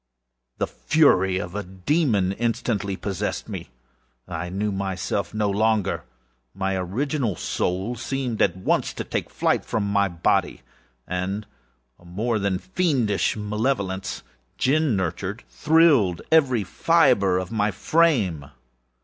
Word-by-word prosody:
The -, -, 0 dB
fury 95 Hz, -, +3 dB
of -, -, -4 dB
a 105 Hz, -, -2 dB
demon 100 Hz, -, 0 dB
instantly 105 Hz, -2 st, -1 dB
possessed 100 Hz, +1 st, -3 dB
me. 95 Hz, -, -6 dB, 0.6 s
I 90 Hz, 0 st, -4 dB
knew 100 Hz, +3 st, -1 dB
myself 95 Hz, -1 st, -2 dB
no 105 Hz, -1 st, 0 dB
longer. 105 Hz, 0 st, +1 dB, 0.5 s
My 95 Hz, 0 st, -1 dB
original 115 Hz, -, -1 dB
soul 95 Hz, +9 st, -2 dB
seemed, 125 Hz, -1 st, -3 dB
at 90 Hz, -2 st, +2 dB
once, 95 Hz, -, 0 dB
to -, -, -4 dB
take -, -, -3 dB
its -, -, -26 dB
flight -, -, +1 dB
from 105 Hz, -, -1 dB
my 100 Hz, 0 st, +2 dB
body 85 Hz, -2 st, 0 dB, 0.4 s
and 95 Hz, +3 st, -3 dB, 0.5 s
a 90 Hz, -, -20 dB
more 110 Hz, +6 st, -1 dB
than 100 Hz, -2 st, 0 dB
fiendish 135 Hz, -, 0 dB
malevolence, 105 Hz, -3 st, -2 dB, 0.3 s
gin 145 Hz, -2 st, +2 dB
nurtured, 95 Hz, +4 st, -3 dB
thrilled 150 Hz, -, +3 dB
every 130 Hz, -9 st, +4 dB
fibre 125 Hz, -, +3 dB
of 95 Hz, +2 st, -4 dB
my 105 Hz, -2 st, +1 dB
frame. 100 Hz, -, +1 dB
100 Hz, 125 wpm, -24 LUFS, 95-125 Hz, 0.6 s, every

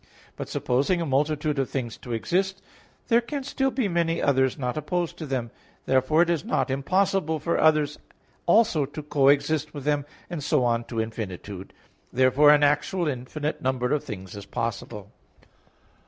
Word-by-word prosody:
But -, -, -6 dB
supposing 140 Hz, +9 st, +1 dB
a 170 Hz, -, -1 dB
multitude 150 Hz, +1 st, 0 dB
of 135 Hz, -, 0 dB
things 120 Hz, -4 st, -3 dB
to 120 Hz, -, -9 dB
exist, 190 Hz, -, -1 dB, 0.4 s
there 235 Hz, 0 st, +4 dB
can 275 Hz, +4 st, -5 dB
still 270 Hz, 0 st, 0 dB
be 255 Hz, -4 st, -1 dB
many 170 Hz, -2 st, 0 dB
others 130 Hz, -2 st, +2 dB
not 125 Hz, -2 st, -2 dB
opposed 170 Hz, +3 st, -2 dB
to 155 Hz, -, -6 dB
them. 125 Hz, -4 st, -2 dB, 0.3 s
Therefore 135 Hz, +5 st, +3 dB
it 175 Hz, -, -3 dB
is 165 Hz, -4 st, 0 dB
not 135 Hz, 0 st, 0 dB
impossible 160 Hz, +3 st, +1 dB
for 165 Hz, +3 st, -1 dB
others 150 Hz, -2 st, +3 dB, 0.5 s
also 170 Hz, -6 st, +4 dB
to 150 Hz, +2 st, -8 dB
coexist 145 Hz, +1 st, +2 dB
with 145 Hz, -, -6 dB
them, 145 Hz, 0 st, 0 dB, 0.2 s
and 170 Hz, -5 st, -5 dB
so 130 Hz, -, +2 dB
on 120 Hz, -1 st, +1 dB
to 115 Hz, -, -4 dB
infinitude; 105 Hz, -4 st, -5 dB, 0.4 s
therefore 130 Hz, +4 st, +5 dB
an 145 Hz, 0 st, +6 dB
actual 150 Hz, +5 st, +1 dB
infinite 145 Hz, +3 st, -3 dB
number 130 Hz, 0 st, 0 dB
of 150 Hz, -, 0 dB
things 95 Hz, -5 st, -8 dB
is 100 Hz, -1 st, -9 dB
possible. 110 Hz, -3 st, -4 dB
145 Hz, 165 wpm, -25 LUFS, 125-165 Hz, 0.5 s, an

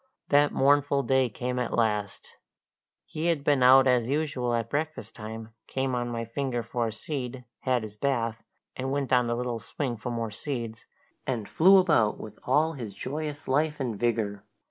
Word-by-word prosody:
That 145 Hz, 0 st, +5 dB
mournful 140 Hz, 0 st, +3 dB
day 130 Hz, -2 st, +2 dB
came 125 Hz, +3 st, -3 dB
at 125 Hz, -, -1 dB
last! 105 Hz, -3 st, -1 dB, 0.7 s
He 160 Hz, +2 st, -3 dB
had 165 Hz, -5 st, +1 dB
been 140 Hz, -2 st, +3 dB
out 130 Hz, +1 st, +8 dB
as 125 Hz, -3 st, +3 dB
usual 135 Hz, -4 st, 0 dB
at 115 Hz, -1 st, -1 dB
breakfast 155 Hz, +5 st, -3 dB
time, 110 Hz, 0 st, -8 dB
came 130 Hz, -1 st, -1 dB
on 120 Hz, -1 st, -1 dB
my 115 Hz, -1 st, -3 dB
finger 120 Hz, 0 st, -2 dB
for 115 Hz, +1 st, -1 dB
a -, -, -3 dB
seed, 125 Hz, +2 st, -5 dB
had 125 Hz, -3 st, 0 dB
his 105 Hz, -1 st, -8 dB
bath, 115 Hz, -3 st, -1 dB, 0.3 s
and 130 Hz, +1 st, -3 dB
went 140 Hz, -1 st, -1 dB
on 125 Hz, -1 st, +4 dB
the 120 Hz, -, 0 dB
little 120 Hz, -1 st, -2 dB
swing 120 Hz, +2 st, -4 dB
for 110 Hz, -, -5 dB
more 115 Hz, -2 st, -3 dB
seeds, 115 Hz, -1 st, -5 dB, 0.4 s
and 115 Hz, -6 st, -2 dB
flew 190 Hz, +4 st, +6 dB
about 150 Hz, -, +3 dB
with 105 Hz, -1 st, -9 dB
all 155 Hz, +5 st, +3 dB
his 115 Hz, -8 st, -7 dB
joyous 150 Hz, +2 st, -5 dB
life 150 Hz, +3 st, +1 dB
and 125 Hz, -5 st, -2 dB
vigour. 110 Hz, -4 st, 0 dB
125 Hz, 180 wpm, -27 LUFS, 115-140 Hz, 0.7 s, out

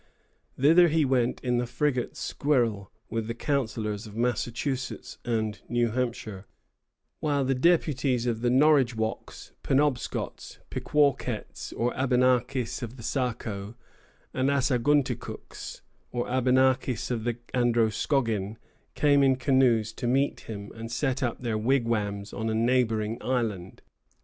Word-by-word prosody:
Thither 165 Hz, +6 st, +6 dB
he 160 Hz, -1 st, +2 dB
went 125 Hz, -2 st, +1 dB
in 125 Hz, -1 st, 0 dB
the 120 Hz, -, -1 dB
frigate 125 Hz, 0 st, -1 dB
"Squirrel," 115 Hz, -9 st, 0 dB, 0.2 s
with 115 Hz, -1 st, -2 dB
the 115 Hz, -, -3 dB
councillors 110 Hz, -6 st, -2 dB
of 105 Hz, -, -11 dB
Massachusetts 125 Hz, +2 st, -2 dB
and 110 Hz, -3 st, -2 dB
New 120 Hz, -1 st, +1 dB
Hampshire; 115 Hz, -5 st, -3 dB, 0.7 s
while 145 Hz, -3 st, 0 dB
the 135 Hz, -, +2 dB
deputies 135 Hz, -4 st, +2 dB
of 115 Hz, -2 st, -1 dB
the 120 Hz, -, +2 dB
Norridgewocks, 125 Hz, -5 st, +1 dB
Penobscots, 135 Hz, -2 st, -1 dB
Pequawkets, 140 Hz, -6 st, 0 dB
or 120 Hz, +1 st, -1 dB
Abenakis 125 Hz, -1 st, +1 dB
of 120 Hz, +1 st, -6 dB
the 115 Hz, -, -10 dB
Saco, 110 Hz, -5 st, -3 dB, 0.6 s
and 130 Hz, +2 st, +1 dB
Assagunticooks, 140 Hz, 0 st, -1 dB, 0.3 s
or 120 Hz, -1 st, -2 dB
Abenakis 130 Hz, -1 st, +2 dB
of 115 Hz, -3 st, -2 dB
the 120 Hz, 0 st, -1 dB, 0.2 s
Androscoggin, 115 Hz, -2 st, +1 dB, 0.4 s
came 145 Hz, -1 st, +4 dB
in 135 Hz, -1 st, +4 dB
canoes 125 Hz, -4 st, +2 dB
to 120 Hz, -, -4 dB
meet 135 Hz, +3 st, +1 dB
him, 100 Hz, -2 st, -8 dB
and 115 Hz, +1 st, -7 dB
set 135 Hz, +1 st, -1 dB
up 120 Hz, -2 st, -2 dB
their 115 Hz, -3 st, -1 dB
wigwams 110 Hz, -5 st, 0 dB
on 110 Hz, 0 st, -2 dB
a 110 Hz, -, -1 dB
neighboring 115 Hz, -2 st, +1 dB
island. 110 Hz, -8 st, -2 dB
120 Hz, 125 wpm, -27 LUFS, 115-135 Hz, 0.7 s, Thither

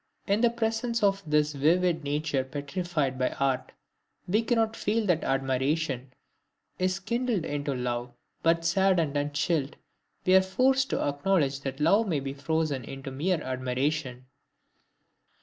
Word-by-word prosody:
In 200 Hz, +3 st, +1 dB
the 240 Hz, -, +5 dB
presence 230 Hz, 0 st, -1 dB
of 195 Hz, -1 st, +3 dB
this 150 Hz, 0 st, +2 dB
vivid 165 Hz, +3 st, +2 dB
nature 145 Hz, -1 st, -1 dB
petrified 145 Hz, 0 st, -3 dB
by 130 Hz, -, +2 dB
art, 135 Hz, -2 st, 0 dB, 0.6 s
we 210 Hz, +5 st, +2 dB
cannot 225 Hz, -1 st, +1 dB
feel 220 Hz, +1 st, 0 dB
that 175 Hz, -5 st, +1 dB
admiration 135 Hz, 0 st, -1 dB, 0.7 s
is 185 Hz, +1 st, 0 dB
kindled 235 Hz, -3 st, -1 dB
into 145 Hz, -1 st, -2 dB
love, 120 Hz, -1 st, -3 dB, 0.3 s
but, 165 Hz, 0 st, +2 dB
saddened 175 Hz, -4 st, +2 dB
and 145 Hz, 0 st, 0 dB
chilled, 145 Hz, 0 st, 0 dB, 0.5 s
we 185 Hz, -, +4 dB
are 190 Hz, -, +8 dB
forced 260 Hz, +8 st, +2 dB
to -, -, 0 dB
acknowledge 145 Hz, -1 st, +1 dB
that 135 Hz, 0 st, -5 dB
love 200 Hz, +9 st, +3 dB
may 160 Hz, -6 st, 0 dB
be 135 Hz, 0 st, -4 dB
frozen 140 Hz, -1 st, -1 dB
into 135 Hz, +2 st, -7 dB
mere 160 Hz, +5 st, 0 dB
admiration. 130 Hz, +1 st, -2 dB
155 Hz, 140 wpm, -28 LUFS, 135-190 Hz, 0.7 s, are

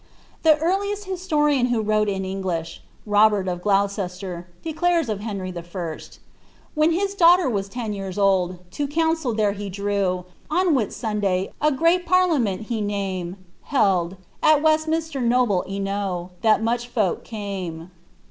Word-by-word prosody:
The 320 Hz, -1 st, +6 dB
eariiest 395 Hz, +6 st, -1 dB
historian 300 Hz, -9 st, +1 dB
who 240 Hz, -2 st, +1 dB
wrote 215 Hz, -1 st, +1 dB
in 190 Hz, -1 st, -2 dB
English, 185 Hz, -4 st, -4 dB, 0.2 s
Robert 205 Hz, -2 st, +3 dB
of 175 Hz, -1 st, -2 dB
Gloucester, 195 Hz, -3 st, -1 dB, 0.2 s
declares 330 Hz, -2 st, +1 dB
of 210 Hz, -2 st, -2 dB
Henry 200 Hz, -4 st, -4 dB
I.' 170 Hz, -2 st, -5 dB, 0.8 s
When 305 Hz, +2 st, +3 dB
his 390 Hz, +4 st, 0 dB
daughter 355 Hz, -3 st, +5 dB
was 200 Hz, -5 st, -1 dB
ten 225 Hz, -1 st, -4 dB
years 195 Hz, -2 st, -5 dB
old, 190 Hz, -3 st, +2 dB
to 290 Hz, +6 st, -2 dB
coaxicil 320 Hz, -5 st, 0 dB
there 210 Hz, -2 st, +3 dB
he 200 Hz, 0 st, -5 dB
drew, 195 Hz, -2 st, -1 dB, 0.2 s
On 360 Hz, +4 st, +2 dB
a -, -, +4 dB
Whitsunday, 210 Hz, -7 st, 0 dB
a 300 Hz, -, +4 dB
greet 335 Hz, +5 st, +2 dB
parliament 310 Hz, -, +2 dB
he 220 Hz, 0 st, -3 dB
namt 190 Hz, -3 st, -3 dB, 0.3 s
(held) 190 Hz, -9 st, +2 dB, 0.3 s
At 310 Hz, -1 st, +4 dB
Weftmh»ter 315 Hz, -1 st, +1 dB
noble 240 Hz, -6 st, +2 dB
enow, 195 Hz, -2 st, -3 dB
that 220 Hz, -1 st, +3 dB
mneh 240 Hz, +1 st, 0 dB
folk 215 Hz, -7 st, 0 dB
came." 185 Hz, -6 st, -6 dB
210 Hz, 140 wpm, -23 LUFS, 190-305 Hz, 0.8 s, The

